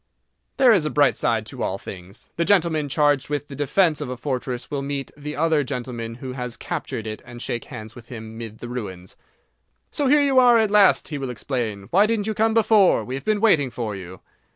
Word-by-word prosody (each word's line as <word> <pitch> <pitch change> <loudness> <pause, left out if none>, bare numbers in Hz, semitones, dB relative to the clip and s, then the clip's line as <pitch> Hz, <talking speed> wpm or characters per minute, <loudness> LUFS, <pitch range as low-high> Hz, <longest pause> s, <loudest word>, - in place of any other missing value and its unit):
There 260 -3 +6
is 190 -7 +3
a - - -1
bright 145 +1 +3
side 110 -2 0
to - - -7
all 95 - -1
things. 95 +1 -10
The 170 - 0
gentleman 165 -6 +2
charged 145 -1 +2
with 145 0 -2
the 140 - -8
defence 155 +2 +2
of 145 - -4
a 125 - -5
fortress 125 -1 -4
will 140 -2 -2
meet 140 -2 -4
the 150 0 -6
other 160 -1 +2
gentleman 120 -3 -5
who 130 +1 -7
has 125 -2 -5
captured 110 - -5
it 110 -1 -6
and 120 -1 -11
shake 120 -1 -4
hands 110 0 -9
with 120 -2 -13
him 110 -2 -9
mid 110 -1 -8
the 120 - -6
ruins. 95 -7 -6 0.8
"So 285 - 0
here 295 +2 +5
you 270 -2 +4
are 245 -2 +6
at 220 -2 +2
last!" 205 -2 +5
he 150 -2 -4
will 135 -2 -4
explain. 115 -4 -3
"Why 200 +4 +5
didn't 220 -2 0
you 220 - -1
come 220 +1 +1
before? 215 -3 +4
We 125 - -6
have 135 - -5
been 215 -1 +1
waiting 160 - +4
for 115 -3 -4
you." 95 -1 -10
135 Hz, 225 wpm, -23 LUFS, 120-180 Hz, 0.8 s, There